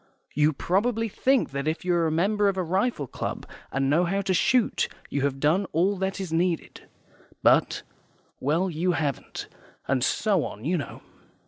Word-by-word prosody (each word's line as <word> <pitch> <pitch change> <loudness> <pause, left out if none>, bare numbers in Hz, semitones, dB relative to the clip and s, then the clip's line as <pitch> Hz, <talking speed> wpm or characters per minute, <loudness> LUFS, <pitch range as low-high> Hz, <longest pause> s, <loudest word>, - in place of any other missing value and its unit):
YOU 150 +2 +3
PROBABLY 220 - 0
THINK 260 - +1
that 140 +2 -3
if 160 +3 -2
you 180 - +2
are 170 -1 +2
a - - 0
member 200 +6 +2
of 195 - -2
a 185 - +1
rifle 190 - 0
club, - - -5 0.3
and 135 0 0
know 160 +6 +3
how 195 +3 0
to 190 -1 0
shoot, 240 +6 +2 0.2
you 140 - 0
have 135 -1 -1
done 160 +8 +2
all 185 +6 +2
that 190 +1 -2
is 185 -4 -4
needed. 170 0 -1 0.5
But - - +3 0.6
well, 160 +7 +1
you 175 +1 0
haven't, 145 -5 -3 0.4
and 130 -2 +1
so 200 -2 +2
on, 105 +4 -7
you 175 +4 +1
know. 155 - -5
175 Hz, 180 wpm, -26 LUFS, 150-195 Hz, 0.6 s, YOU